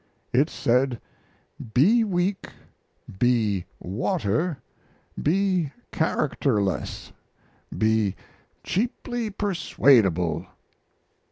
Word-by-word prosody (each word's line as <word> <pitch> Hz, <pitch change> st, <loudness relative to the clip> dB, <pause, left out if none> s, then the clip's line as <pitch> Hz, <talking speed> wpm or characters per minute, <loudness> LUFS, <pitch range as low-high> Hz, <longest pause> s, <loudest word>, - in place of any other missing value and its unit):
It 140 Hz, +6 st, +3 dB
said, 125 Hz, 0 st, +1 dB, 0.8 s
"Be 210 Hz, -, +5 dB
weak, 190 Hz, -1 st, -1 dB, 0.7 s
be 110 Hz, -7 st, +2 dB
water, 145 Hz, -, -1 dB, 0.6 s
be 180 Hz, -2 st, +1 dB, 0.2 s
characterless, 120 Hz, -, -1 dB, 0.6 s
be 110 Hz, -3 st, +2 dB, 0.5 s
cheaply 240 Hz, +2 st, -2 dB
persuadable." 130 Hz, -, +2 dB
135 Hz, 60 wpm, -25 LUFS, -, 0.8 s, Be